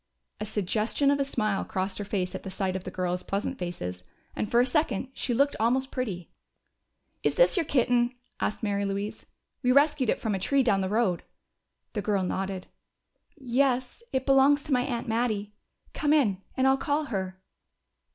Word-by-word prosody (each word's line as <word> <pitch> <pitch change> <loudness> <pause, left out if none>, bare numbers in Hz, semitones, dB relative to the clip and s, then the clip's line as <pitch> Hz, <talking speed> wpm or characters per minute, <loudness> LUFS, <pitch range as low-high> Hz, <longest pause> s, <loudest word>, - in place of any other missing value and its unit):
A 210 - -3
suggestion 215 +7 +1
of 285 - +1
a - - +3
smile 215 -7 -1
crossed 190 +2 -3
her - - -2
face 190 -2 -2
at - - -5
the 195 - -7
sight 190 0 -2
of 190 - -4
the - - -3
girls' 180 -1 -2
pleasant 210 +7 -3
faces, 90 - -5 0.3
and 210 - -2
for 235 - +4
a 245 - +5
second 265 -4 0
she 260 - -3
looked 280 +4 +3
almost 260 +4 +1
pretty. 200 -10 -4 0.9
"Is - - +1
this - - +5
your 340 -5 +1
kitten?" 245 -1 +2 0.2
asked 210 - -2
Mary 200 -1 0
Louise. 200 +1 -3 0.3
"We 250 -2 +3
rescued 285 -2 +4
it - - +1
from 220 - -1
a 195 - -1
tree 275 +8 +2
down 200 -5 +3
the 190 - -1
road." 205 -5 +1 0.7
The 210 - -1
girl 200 -2 +1
nodded. 190 0 -2 0.7
"Yes. 255 - 0
It 260 0 -1
belongs 275 +1 +5
to 290 - -1
my 250 - +4
aunt 245 -1 -3
Mattie. 220 -3 -1 0.4
Come 300 -1 +2
in, 210 -11 +3 0.2
and 260 - +3
I'll 265 0 +5
call 290 +3 0
her." 190 -8 -4
230 Hz, 185 wpm, -28 LUFS, 195-265 Hz, 0.9 s, a